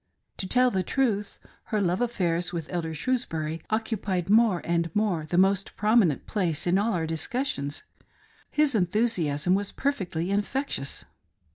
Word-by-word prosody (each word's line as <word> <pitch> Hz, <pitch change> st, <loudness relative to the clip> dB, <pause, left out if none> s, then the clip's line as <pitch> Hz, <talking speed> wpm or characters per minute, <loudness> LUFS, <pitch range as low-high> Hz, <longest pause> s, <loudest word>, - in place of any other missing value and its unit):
To 190 Hz, -, -4 dB
tell 250 Hz, +4 st, +3 dB
the 190 Hz, -, +1 dB
truth, 210 Hz, -1 st, -1 dB, 0.3 s
her 215 Hz, -, -1 dB
love 180 Hz, 0 st, +1 dB
affairs 175 Hz, -7 st, 0 dB
with 170 Hz, -1 st, -5 dB
Elder 160 Hz, -2 st, -2 dB
Shrewsbury 165 Hz, -9 st, -2 dB
occupied 210 Hz, -5 st, -1 dB
more 220 Hz, -5 st, +5 dB
and 170 Hz, 0 st, 0 dB
more 190 Hz, -7 st, 0 dB
the 175 Hz, -, 0 dB
most 195 Hz, +1 st, +2 dB
prominent 210 Hz, -, +3 dB
place 175 Hz, -8 st, -1 dB
in 180 Hz, +2 st, +3 dB
all 220 Hz, +2 st, +1 dB
our 165 Hz, -3 st, 0 dB
discussions. 160 Hz, -, -2 dB, 0.7 s
His 300 Hz, -2 st, +2 dB
enthusiasm 180 Hz, -6 st, +1 dB
was 200 Hz, +1 st, 0 dB
perfectly 190 Hz, -, -2 dB
infectious. 205 Hz, -, -2 dB
190 Hz, 140 wpm, -27 LUFS, 170-225 Hz, 0.7 s, more